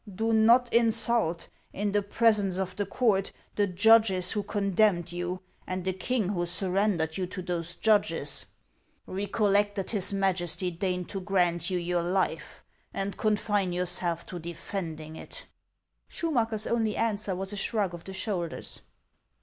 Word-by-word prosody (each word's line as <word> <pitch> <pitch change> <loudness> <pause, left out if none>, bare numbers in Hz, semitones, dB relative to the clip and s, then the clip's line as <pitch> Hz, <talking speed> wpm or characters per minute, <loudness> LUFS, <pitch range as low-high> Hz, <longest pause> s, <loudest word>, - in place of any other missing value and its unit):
Do 225 +4 0
not 235 +3 +5
insult, 230 -6 +2 0.3
in 205 +1 -1
the 205 0 +2
presence 205 -2 +2
of 190 -1 -2
the 205 -2 -2
court, 200 -4 +1 0.2
the 205 -1 +2
judges 195 -1 +4
who 210 - 0
condemned 200 -3 +1
you, 175 +1 -3 0.3
and 185 0 -3
the 190 - 0
king 215 +1 -1
who 175 -3 -1
sur 185 +2 -2
rendered 180 -5 +1
you 185 -1 -1
to 185 0 -6
those 175 -1 -3
judges. 165 -9 +1 0.6
.Recollect 205 +1 +1
that 195 -3 -3
his 205 -4 +1
Majesty 185 -2 0
deigned 180 +1 -2
to 195 - -4
grant 180 -3 +1
you 185 - 0
your 175 0 0
life, 185 +2 -1 0.3
and 195 0 -3
confine 205 -3 +1
yourself 175 -1 -1
to 180 - -6
defending 165 -2 -5
it." - - -9 0.6
Schumacker's 230 -9 0
only 225 -3 0
answer 210 -4 -1
was 195 +2 -4
a - - -3
shrug 200 -2 0
of 170 -1 -8
the 190 - -7
shoulders. 190 -5 -4
195 Hz, 150 wpm, -28 LUFS, 180-210 Hz, 0.6 s, not